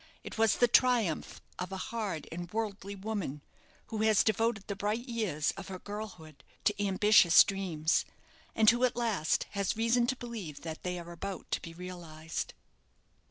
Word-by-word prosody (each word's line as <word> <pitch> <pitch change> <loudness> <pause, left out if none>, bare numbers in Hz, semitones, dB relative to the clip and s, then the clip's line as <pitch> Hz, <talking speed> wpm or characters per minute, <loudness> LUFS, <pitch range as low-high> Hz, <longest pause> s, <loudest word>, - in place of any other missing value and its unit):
It - - -7
was 225 -1 +3
the 245 - +4
triumph 235 -8 +2 0.2
of 180 +1 -4
a 190 - -3
hard 200 -6 -4
and 175 +1 -6
worldly 205 -2 -3
woman, 190 -8 -4 0.5
who 220 - -3
has 220 -2 +5
devoted 220 -1 +1
the 200 - -4
bright 210 +5 -2
years 210 -11 0
of 195 - -7
her 190 -1 -6
girlhood 180 -8 -8 0.2
to 205 0 +1
ambitious 195 -3 +7
dreams; 175 -5 0 0.5
and 220 -1 +3
who, 240 +3 +6
at 250 - +3
last, 225 -10 +1
has 200 +2 -1
reason 235 +1 +3
to 260 - +1
believe 225 - -7
that 160 -1 -6
they 180 0 -3
are 170 0 -8
about 190 +3 -6
to - - 0
be 165 -1 -9
realized. 170 -3 -6
200 Hz, 165 wpm, -31 LUFS, 175-225 Hz, 0.5 s, ambitious